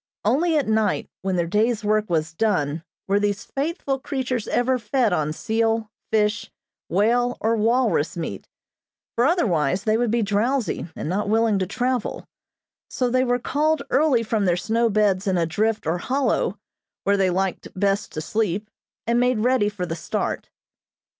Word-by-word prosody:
Only 310 +9 +3
at 285 - 0
night, 220 -1 0
when 190 -1 -1
their 170 -1 +1
day's 215 +5 +1
work 215 0 +1
was 165 -1 0
done, 165 -6 0 0.2
were 200 +1 +3
these 205 0 -1
faithful 280 -1 -2
creatures 255 -4 -3
ever 255 +1 +1
fed 230 -1 +1
on 155 -3 0
seal, 225 +4 0 0.2
fish, 215 0 +1 0.4
whale, 240 +6 +2
or 225 +1 +1
walrus 225 - +1
meat, 155 - -5 0.7
for 240 - +2
otherwise 185 - +1
they 215 0 +2
would 240 0 +1
be 230 +1 +1
drowsy, 215 +2 0
and - - -5
not 200 +4 -1
willing 220 -2 +3
to 185 - -1
travel; 245 +3 -2 0.6
so 250 -2 -1
they 255 +1 +3
were 245 -1 +1
called 295 +4 0
early 275 -6 +3
from 215 -2 0
their 175 -1 +2
snow 230 +5 +1
beds 205 -2 +2
in 185 -2 +2
a 170 - +2
drift 215 +6 0
or 165 +3 0
hollow, 270 +8 0 0.5
where 200 - +3
they 190 -2 +2
liked 190 +1 -1
best 200 +1 +1
to 155 - -3
sleep, 210 +3 -2 0.3
and 235 +1 +2
made 250 -3 +2
ready 245 -3 +3
for 200 -4 -4
the 165 -2 -4
start. 155 - -3
215 Hz, 165 wpm, -23 LUFS, 195-245 Hz, 0.7 s, Only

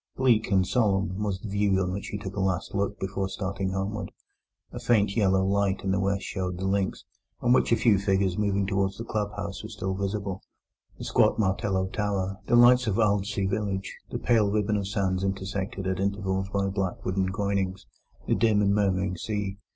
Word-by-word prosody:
Bleak 120 -4 +3
and 95 -2 +3
solemn 100 -3 +1
was 100 -3 -1
the 110 - -7
view 100 -1 +1
on 90 -1 0
which 100 +2 -4
he 105 - -4
took 100 -1 -7
a - - -3
last 95 +1 -1
look 100 0 -1
before 95 0 -2
starting 95 0 -3
homeward. 95 +2 -3 0.6
A - - -6
faint 105 -4 +2
yellow 95 -3 +3
light 100 0 +1
in 95 - 0
the 95 - +1
west 100 0 0
showed 90 -2 -3
the 95 - -3
links, 95 0 -1 0.3
on 120 0 +3
which 130 - +3
a - - +6
few 110 -3 +3
figures 95 -2 +1
moving 100 -1 +1
towards 95 0 0
the 115 - -5
club 105 -2 -2
house 95 - -5
were 110 - -8
still 95 -3 -3
visible, 100 0 -3 0.6
the - - -7
squat - - +3
martello 95 -2 +1
tower, 95 -1 -2
the - - +3
lights 125 +1 +6
of 100 - +1
Aldsey 105 -1 +1
village, 95 -1 -2
the - - -3
pale 110 -4 +2
ribbon 105 0 +1
of 100 -2 -2
sands 95 -2 0
intersected 95 +1 -3
at 95 0 -1
intervals 95 -1 -1
by 100 0 0
black 95 -2 -3
wooden 95 0 0
groynings, 95 -1 -2 0.4
the - - +2
dim 110 -2 +3
and 100 0 +3
murmuring 95 -2 +1
sea. 100 0 -3
100 Hz, 195 wpm, -27 LUFS, 95-105 Hz, 0.6 s, a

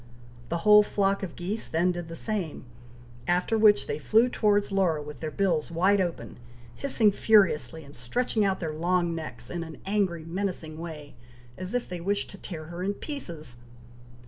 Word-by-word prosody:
The 170 - 0
whole 210 0 +9
flock 200 -1 +1
of 190 -4 -5
geese 195 +5 -3
then 175 +3 +2
did 175 -2 -5
the 165 - -7
same, 185 - -4 0.6
after 180 +5 +2
which 210 -10 +5
they 145 - -3
flew 225 - +4
towards 205 -3 +2
Laura, 185 -5 +2
with 150 -2 -8
their 155 - -3
bills 165 -2 0
wide 190 +4 +3
open, 165 - -4 0.4
hissing 230 - +2
furiously, 165 - +3
and 140 0 -14
stretching 215 - 0
out 195 -1 +1
their 160 -3 -3
long 175 +2 +1
necks 160 -1 -6
in 175 -1 -3
an 160 -1 -9
angry 190 -5 0
menacing 170 -3 -3
way, 155 -3 -8 0.4
as 185 +5 -4
if 245 - -1
they 180 -2 -6
wished 200 +3 -1
to 195 - -12
tear 160 -4 -7
her 170 +3 -7
in 200 +2 -1
pieces. 165 - -6
180 Hz, 175 wpm, -27 LUFS, 160-205 Hz, 0.6 s, whole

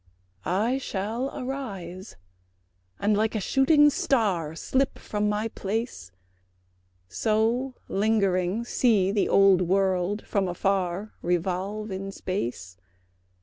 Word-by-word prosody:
I 225 +8 +1
shall 225 +3 -3
arise, 200 -9 -6 0.8
and 210 +1 +2
like 220 +2 +1
a - - +1
shooting 290 - +4
star 190 - 0
Slip 265 +10 0
from 210 0 -2
my 210 +2 0
place; 210 - -4 1.0
So 225 - 0
lingering 200 0 +1
see 215 -6 +2
the 205 0 +1
old 195 -2 +5
world 190 +2 +1
from 195 -2 0
afar 190 +2 -1
Revolve 185 +5 -2
in 195 +1 -4
space. 120 - -4
200 Hz, 105 wpm, -26 LUFS, 185-225 Hz, 1.0 s, old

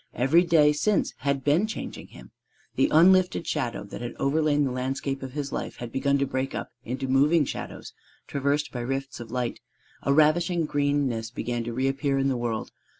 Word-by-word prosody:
Every 135 +8 +4
day 155 -4 +4
since 200 +8 +1
had 140 0 -1
been 155 +10 +3
changing 220 - -6
him. - - -14 0.4
The - - +3
unlifted 180 +2 +4
shadow 115 -3 -2
that 100 - -9
had 120 - -5
overlain 145 +1 +2
the 135 - 0
landscape 135 +2 -3
of 130 -1 -7
his 140 -2 -4
life - - -4
had 120 -1 -7
begun 140 +2 +1
to 140 - +1
break 130 0 -3
up - - -5
into 130 +3 -4
moving 145 +4 +4
shadows - - -7 0.3
traversed 140 +1 -1
by 125 - -5
rifts 135 +2 -3
of 120 -2 -8
light: 125 -1 -2 0.4
a 140 - 0
ravishing 160 +3 +3
greenness 145 -6 0
began 120 0 -3
to 120 - -4
reappear 135 +2 0
in 135 0 +2
the 130 - 0
world. 115 -2 -3
140 Hz, 185 wpm, -26 LUFS, 130-150 Hz, 0.4 s, Every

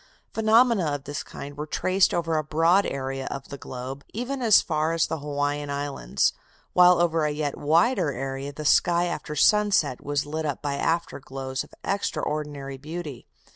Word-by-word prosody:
Phenomena 225 -3 +4
of 140 - -7
this 145 +1 -4
kind 140 +1 -9
were 150 +1 -5
traced 185 +4 +2
over 165 -1 0
a 155 - +1
broad 165 +6 +3
area 135 0 -4
of 135 - -7
the 140 - -7
globe, 130 +2 -7
even 255 +4 -3
as 225 -4 +6
far 155 -1 0
as 165 - +2
the 160 - -4
Hawaiian 145 0 -2
Islands, 140 - -1 0.4
while 180 -1 +6
over 165 -2 +2
a 150 - +2
yet 150 -1 -2
wider 170 - +2
area 135 +1 -4
the 150 +1 -8
sky 170 +3 +4
after 150 -3 -4
sunset 195 - +3
was 145 0 -1
lit 155 +2 -3
up 145 - -3
by 145 -1 -2
after 165 +3 -1
glows 130 -1 -5
of - - -17
extraordinary 150 -7 -3
beauty. 150 -3 -7
150 Hz, 175 wpm, -25 LUFS, 140-175 Hz, 0.4 s, as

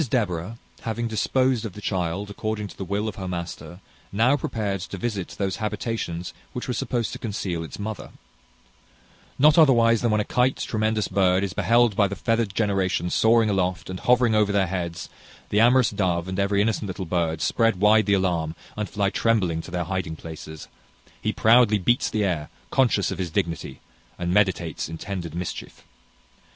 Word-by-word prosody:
Mrs 140 - -2
Deborah, 105 -3 -1 0.2
having 115 +1 -2
disposed 125 +3 +1
of 110 -5 -5
the 105 - -9
child 95 0 -2
according 110 0 -3
to - - -12
the - - -5
will 100 +3 -2
of 105 - -5
her 95 -1 -5
master, 90 +1 -6 0.3
now 115 +7 +3
prepared 105 -8 -2
to 100 - -6
visit 100 -3 -4
those 95 -2 -1
habitations 105 -5 -3 0.2
which 125 - -5
were 125 - -1
supposed 120 -2 -2
to - - -6
conceal 95 -6 -3
its 80 - -8
mother. 105 0 -5 1.3
Not 150 +4 +6
otherwise 115 -7 +5
than 120 - +1
when 105 0 +2
a - - +1
kite, 125 +1 +1
tremendous 110 -1 -1
bird, 95 0 +2
is 95 -3 -2
beheld 120 -2 +3
by 100 -1 +3
the 100 - -5
feathered 115 -3 0
generation 95 -4 0
soaring 115 0 +4
aloft, 95 -2 -1
and 95 - -5
hovering 125 -2 +3
over 105 -1 +3
their 100 -1 +2
heads, 85 -2 -4 0.4
the 105 - +2
amorous 125 +1 +5
dove, 90 -3 0
and 95 +1 -3
every 100 +1 +2
innocent 110 -1 -1
little 95 0 -5
bird, 80 -2 -1
spread 115 -1 +1
wide 105 +2 +5
the 100 - +4
alarm, 85 -4 0 0.2
and 105 -1 -3
fly 100 -1 0
trembling 95 -10 +1
to - - -11
their 90 0 -2
hiding 90 -2 -3
places. 80 -1 -9 0.5
He - - 0
proudly 115 -1 +5
beats 120 +6 +1
the 110 -1 0
air, 85 -6 -1 0.2
conscious 120 -7 +2
of - - -5
his 90 -2 -2
dignity, 85 -1 -3 0.4
and 90 0 -2
meditates 95 -6 +1
intended 85 0 -5
mischief. 90 0 -6
100 Hz, 180 wpm, -24 LUFS, 90-115 Hz, 1.3 s, Not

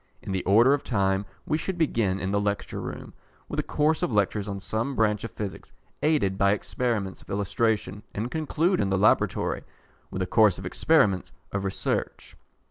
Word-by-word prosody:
In - - -5
the 95 -1 -1
order 115 +8 +6
of 145 - 0
time, 95 -3 0 0.2
we 155 +1 0
should 190 +2 -3
begin, 115 - +1
in 95 - -2
the 100 0 +1
Lecture 100 0 -2
Room, - - -7 0.3
with - - -3
a - - +4
course 155 +2 +1
of 175 - 0
lectures 105 -1 +1
on 100 -1 -4
some 115 +7 -2
branch 105 -2 +1
of 115 - -4
Physics 105 -2 -7 0.3
aided 140 -12 +2
by 100 0 +4
experiments 105 -4 -2
of - - -19
illustration, 105 +1 0
and 115 +4 -3
conclude, 160 +4 +1
in 100 - +1
the 95 - +1
Laboratory, 100 +3 +2 0.5
with 95 - -2
a - - -1
course 105 -1 +4
of 90 - -8
experiments 100 - +2 0.2
of 100 0 -2
research. 95 -1 -3
105 Hz, 185 wpm, -26 LUFS, 95-125 Hz, 0.5 s, order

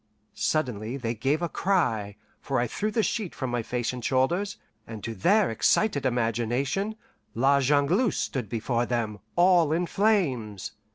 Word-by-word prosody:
Suddenly 125 -5 -1
they 115 -3 -2
gave 135 +9 0
a - - +1
cry, 120 - 0 0.2
for 135 - -2
I 120 - +1
threw 205 - -2
the 225 0 0
sheet 210 -5 -2
from 130 -2 -3
my 120 -1 0
face 120 +2 -2
and 125 -1 -7
shoulders, 165 - +1 0.3
and 110 -2 -8
to 115 - -4
their 200 - +3
excited 140 - +2
imagination 125 - -1 0.4
La 135 +4 +4
Jongleuse 145 - +2
stood 125 -8 -3
before 115 +1 -1
them, 110 -4 -2 0.2
all 175 -3 +4
in 170 +3 +1
flames. 145 - 0
135 Hz, 155 wpm, -27 LUFS, 115-175 Hz, 0.4 s, La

